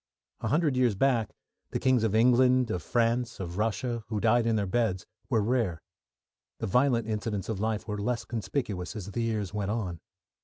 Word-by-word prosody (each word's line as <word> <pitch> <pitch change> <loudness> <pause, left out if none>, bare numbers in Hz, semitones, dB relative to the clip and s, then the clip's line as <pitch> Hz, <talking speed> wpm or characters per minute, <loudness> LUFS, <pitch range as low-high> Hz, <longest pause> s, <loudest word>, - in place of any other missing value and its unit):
A - - -3
hundred 150 -2 +2
years 125 -4 +3
back, 120 -1 +2 0.4
the - - -2
kings 130 -3 +3
of 110 -1 +1
England, 125 +1 +4
of 90 - -2
France, 120 0 0
of 90 0 -5
Russia 115 +2 -1
who 110 -2 -2
died 115 +2 +3
in 115 - +2
their 105 -2 +1
beds 95 -3 0 0.2
were 115 -5 +2
rare. 110 -8 0 0.8
The - - -3
violent 125 +2 +2
incidents 105 -2 -3
of 110 -4 -2
life 110 0 -1
were 105 -1 -3
less 120 +1 -1
conspicuous 110 - -3
as 100 -2 -6
the 120 - -2
years 105 -4 -2
went 100 -2 -2
on. 100 -6 -2
115 Hz, 185 wpm, -28 LUFS, 105-120 Hz, 0.8 s, England